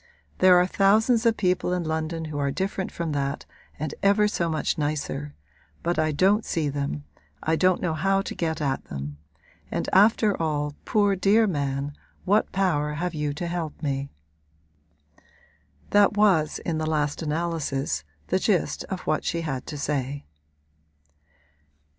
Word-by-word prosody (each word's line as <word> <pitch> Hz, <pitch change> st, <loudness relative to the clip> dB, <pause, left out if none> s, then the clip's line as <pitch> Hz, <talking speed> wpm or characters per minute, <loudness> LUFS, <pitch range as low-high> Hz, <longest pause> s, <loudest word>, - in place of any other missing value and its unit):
There 185 Hz, -1 st, +7 dB
are 180 Hz, -, +5 dB
thousands 220 Hz, +5 st, +3 dB
of 230 Hz, -, +2 dB
people 180 Hz, -1 st, +1 dB
in 180 Hz, -1 st, -1 dB
London 160 Hz, +1 st, -2 dB
who 150 Hz, -2 st, -4 dB
are 140 Hz, -1 st, +1 dB
different 190 Hz, +4 st, -2 dB
from 170 Hz, -2 st, -3 dB
that 140 Hz, -1 st, -2 dB, 0.3 s
and 155 Hz, -1 st, -3 dB
ever 200 Hz, +1 st, +4 dB
so 170 Hz, -5 st, -1 dB
much 155 Hz, -1 st, 0 dB
nicer; 145 Hz, -1 st, -3 dB, 0.5 s
but 175 Hz, 0 st, 0 dB
I 155 Hz, 0 st, +2 dB
don't 195 Hz, +8 st, +3 dB
see 155 Hz, -3 st, -1 dB
them, 140 Hz, -, -3 dB, 0.4 s
I 160 Hz, -, +2 dB
don't 185 Hz, +2 st, +2 dB
know 170 Hz, -3 st, 0 dB
how 195 Hz, +5 st, +1 dB
to -, -, -5 dB
get 160 Hz, -2 st, -2 dB
at 135 Hz, -2 st, -1 dB
them; 70 Hz, +1 st, -6 dB, 0.5 s
and -, -, -2 dB
after 210 Hz, +1 st, +5 dB
all, 150 Hz, -2 st, -1 dB
poor 205 Hz, -2 st, +2 dB
dear 205 Hz, +4 st, +4 dB
man, 140 Hz, -5 st, -2 dB, 0.3 s
what 205 Hz, +3 st, +2 dB
power 150 Hz, -6 st, +1 dB
have 175 Hz, +3 st, -2 dB
you 150 Hz, -2 st, -1 dB
to 175 Hz, -, -4 dB
help 170 Hz, -3 st, -4 dB
me?' 140 Hz, -1 st, -2 dB, 1.8 s
That 205 Hz, 0 st, +4 dB
was 185 Hz, -8 st, +3 dB
in 160 Hz, -2 st, -1 dB
the 155 Hz, 0 st, -1 dB
last 150 Hz, -1 st, 0 dB
analysis 150 Hz, -, -2 dB, 0.3 s
the -, -, +2 dB
gist -, -, 0 dB
of -, -, -5 dB
what -, -, -1 dB
she 170 Hz, -, -1 dB
had 135 Hz, -6 st, -4 dB
to 150 Hz, -, -5 dB
say. 140 Hz, -1 st, -2 dB
160 Hz, 155 wpm, -25 LUFS, 145-190 Hz, 1.8 s, There